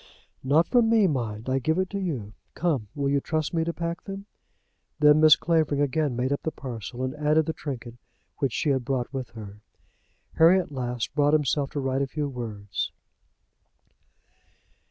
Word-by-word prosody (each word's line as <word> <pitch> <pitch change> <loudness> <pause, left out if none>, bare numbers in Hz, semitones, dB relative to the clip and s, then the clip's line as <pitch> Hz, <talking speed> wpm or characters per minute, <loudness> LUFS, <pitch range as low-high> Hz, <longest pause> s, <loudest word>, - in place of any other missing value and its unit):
"Not 150 +6 +4
from 240 0 +3
me, 225 -3 +5
mind. 115 - -2
I 130 +1 +1
give 160 +6 0
it 185 0 +1
to 200 - -2
you. 130 - -4 0.2
Come; 150 -11 0
will 140 -1 -1
you 140 0 +2
trust 155 +3 -2
me 165 -1 +1
to 170 - -1
pack 170 0 -4
them?" 195 0 -7 0.7
Then 150 0 +6
Mrs. 155 -1 +7
Clavering 160 -4 +1
again 145 -1 +1
made 125 +2 -1
up 140 - -3
the - - -1
parcel, 120 -4 -6
and 130 0 -2
added 150 +1 +2
the 160 - -2
trinket 120 -6 -7 0.4
which 135 -3 +1
she 145 +5 0
had 130 -2 0
brought 130 0 -2
with 130 -2 -4
her. 105 -1 -9 0.8
Harry 170 +4 +7
at 175 - -5
last 125 -3 -3
brought 145 0 +3
himself 145 -2 +1
to 145 - -2
write 135 0 0
a 140 - 0
few 150 +2 -3
words. 110 -6 -4
145 Hz, 180 wpm, -26 LUFS, 125-160 Hz, 0.8 s, Mrs